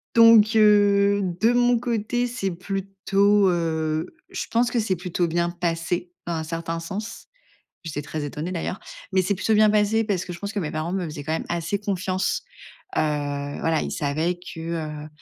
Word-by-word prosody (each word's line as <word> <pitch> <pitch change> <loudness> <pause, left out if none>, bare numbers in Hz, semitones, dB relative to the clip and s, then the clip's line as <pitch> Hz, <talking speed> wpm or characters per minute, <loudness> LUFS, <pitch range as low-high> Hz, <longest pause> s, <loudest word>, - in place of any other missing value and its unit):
donc 230 -1 +7
heu, 205 -1 +5 0.2
de 225 +2 +5
mon 245 0 +4
côté, 240 +1 -1
c'est 230 -6 -2
plutôt, 195 +2 +1
heu, 160 - -1
je 380 - -4
pense 235 +1 +2
que 240 - +1
c'est 210 -4 0
plutôt 175 0 -1
bien 170 +1 0
passé, 175 0 -2
dans 175 - -2
un 160 -1 -2
certain 165 +1 -4
sens. 190 +6 -6 0.6
J'étais 150 -3 -4
très 150 +1 -4
étonnée, 150 +5 -4
d'ailleurs. 185 +2 -3 0.3
Mais 190 0 +3
c'est 200 +3 0
plutôt 210 +4 +1
bien 215 0 +6
passé 215 +1 +2
parce 195 -4 -1
que 180 - -5
je 170 - -9
pense 200 0 -5
que 210 - -3
mes 155 - -3
parents 155 +3 -3
me 190 -2 -1
faisaient, 150 -2 -7
quand 155 - -2
même, 160 - -2
assez 170 +4 -1
confiance. 190 -2 -1 0.5
Heu, - - +2
voilà, 145 +1 -1
ils - - -3
savaient 155 +5 0 0.2
que, 165 - -8
heu, 155 -2 -4
180 Hz, 185 wpm, -24 LUFS, 165-210 Hz, 0.6 s, donc